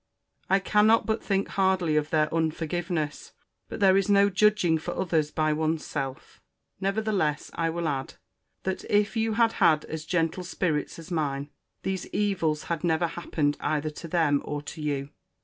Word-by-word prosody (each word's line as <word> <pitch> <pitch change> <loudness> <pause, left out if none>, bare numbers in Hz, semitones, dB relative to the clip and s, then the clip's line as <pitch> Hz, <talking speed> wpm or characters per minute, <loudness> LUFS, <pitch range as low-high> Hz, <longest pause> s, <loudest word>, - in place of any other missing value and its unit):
I 195 - +5
cannot 210 +3 +4
but 220 0 -1
think 195 -1 0
hardly 190 -5 +1
of 150 0 +1
their 155 -1 +2
unforgiveness: 165 0 -2 0.4
but - - -6
there 190 -2 +5
is 195 0 +2
no 200 0 +5
judging 190 -4 +3
for 175 +3 -5
others 165 -5 0
by 155 0 +1
one's 155 +1 -1
self. 135 -1 -5 0.4
Nevertheless 195 -6 0
I 165 -1 0
will 170 0 -2
add, 135 -3 -3 0.5
that, 190 0 -2
if 205 +2 +1
you 225 0 +1
had 230 0 +3
had 155 -4 +4
as 155 -1 -6
gentle 170 +1 0
spirits 170 -4 -2
as 165 +1 -11
mine, 145 -3 -2 0.3
these 190 -1 -2
evils 185 -7 0
had 170 -1 -3
never 165 0 +2
happened 155 -3 -1
either 155 0 -1
to 165 - -9
them 155 -4 +2
or 145 0 -4
to 155 +2 -8
you. 140 -2 -2
165 Hz, 165 wpm, -27 LUFS, 155-195 Hz, 0.5 s, I